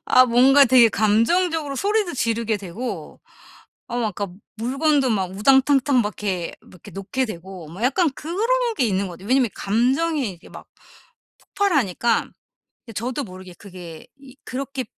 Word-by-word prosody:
아 255 - +6
뭔가 265 +4 +6
되게 240 -2 +6
감정적으로 280 - +1
소리도 410 +1 0
지르게 230 -2 0
되고 205 +6 -7 0.7
어 240 - -4
막 230 -2 0
아까 200 -1 -4 0.3
물건도 275 +3 +1
막 190 -4 -1
우당탕탕 270 +3 +4
막 210 0 -4
이렇게 185 -4 -2
막 - - -21
이렇게 175 - -14
놓게 195 +7 -2
되고 185 -4 -9
뭐 180 +7 -9
약간 285 +6 +2
그런 335 +7 -6 0.4
게 255 - +2
있는 195 -1 0
것 - - -8
같아요. 190 +5 -12
왜냐하면 255 -3 +3
감정이 260 +5 0
이렇게 175 -3 -14
막 - - -12 0.7
폭발하니까 270 - 0 0.6
그러니까 230 - -11
저도 250 +5 -3
모르게 185 -2 -11
그게 180 -5 -11
이 270 -1 -16
그렇게 270 -1 -5
240 Hz, 340 characters per minute, -22 LUFS, 200-275 Hz, 0.7 s, 아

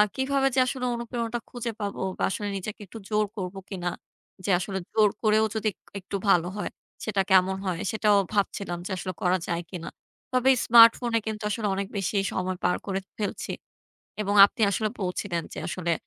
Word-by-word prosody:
কিভাবে 270 +1 +1
যে - - +4
আসলে 250 -1 -2
অনুপ্রেরণাটা 235 0 -3
খুঁজে 240 -1 -4
পাবো 200 -1 -3 0.2
বা - - -2
আসলে 205 +1 -3
নিজেকে 205 +3 -6
একটু 225 - -10
জোর 215 -1 +2
করব 185 0 -4
কিনা! 180 -3 -3 0.6
যে - - -2
আসলে 190 +1 -3
জোর 215 -2 +5
করেও 215 0 +4
যদি 220 0 0
এক - - -51 0.2
একটু 190 - -7
ভালো 175 -2 +4
হয়, - - -2 0.3
সেটা 205 -3 +1
কেমন 190 0 +5
হয়? 180 -3 -1
সেটাও 210 -2 +3 0.2
ভাবছিলাম 200 -3 -1
যে - - -5
আসলে 185 0 -4
করা 180 +1 +3
যায় 170 0 -1
কিনা? 175 -3 -6 0.4
তবে 255 +1 +3 0.2
স্মার্টফোনে 230 0 +7
কিন্তু 215 0 -4
আসলে 210 0 -1
অনেক 195 0 -2
বেশি 200 +1 -1 0.2
সময় 185 0 -2
পার 180 - +2
করে 195 -1 -1 0.2
ফেলছি 205 -2 -3 0.7
এবং 205 -1 0
আপনি 215 - -12
আসলে 215 +2 0
বলছিলেন 180 -2 -2
যে - - -8
আসলে 170 -2 -1
205 Hz, 180 wpm, -26 LUFS, 185-225 Hz, 0.7 s, স্মার্টফোনে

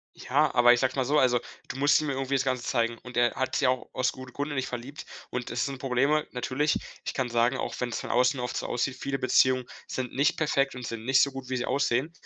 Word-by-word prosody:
Ja, 150 +4 +1
aber 120 0 +7
ich 120 - +1
sage 130 -1 +1
es - - -11
mal 130 -2 0
so. 150 +3 +3
Also, 125 -2 +3 0.3
du - - -6
musst 145 +2 +4
ihm 155 - -3
ja 135 - -1
irgendwie 135 0 -2
das 135 - +2
Ganze 130 -2 -1
zeigen. 115 -1 0
Und 125 0 -10
er 120 -1 +3
hat 130 - -1
sich - - +1
ja 130 - +4
auch 130 0 -2
aus 130 -1 +1
gute 130 -1 -11
Grund 145 +1 -3
in 145 - -4
dich 130 - 0
verliebt. 125 +4 -7 0.2
Und 125 -1 -4
es 120 - 0
sind 140 -1 -4
Probleme, 135 +4 +1
natürlich. 130 +4 0 0.3
Ich - - -3
kann 130 -2 -1
sagen, 120 +3 +2
auch - - -3
wenn's 120 -2 -2
von - - -7
außen 125 +2 +2
oft 125 0 -3
so - - -3
aussieht, 125 +2 -1
viele 135 0 -2
Beziehungen 130 0 +3 0.2
sind 125 -2 -4
nicht 140 +2 +3
perfekt 135 -4 +1
und 125 -1 -6
sind 115 0 -6
nicht 135 +1 +5
so 140 - +3
gut, 130 -1 -8
wie 130 - -1
sie 125 - -2
aussehen. 135 +2 0
130 Hz, 275 wpm, -27 LUFS, 125-135 Hz, 0.3 s, aber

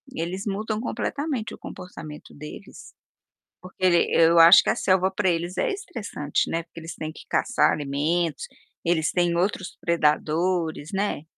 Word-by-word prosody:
eles 180 +4 -4
mudam 215 +2 -2
completamente 255 +1 -3
o - - -9
comportamento 155 -5 -10
deles. 150 +7 -11 0.7
Porque 185 +1 -11
ele 175 -2 +4
eu 165 0 +5
acho 165 +4 +9
que - - -1
a - - +2
selva 190 0 +2
para 190 0 +1
eles 175 +1 -2
é - - +1
estressante, 235 - -3
né, 165 0 -1
porque 165 - -13
eles 165 0 -8
têm 155 0 -5
que - - -13
caçar - - +2
alimentos, 150 +2 -1 0.4
eles 165 -2 +1
têm 175 -1 +1
outros 185 +1 -2
predadores, 165 0 0
né. 195 -6 -1
175 Hz, 155 wpm, -24 LUFS, 160-195 Hz, 0.7 s, acho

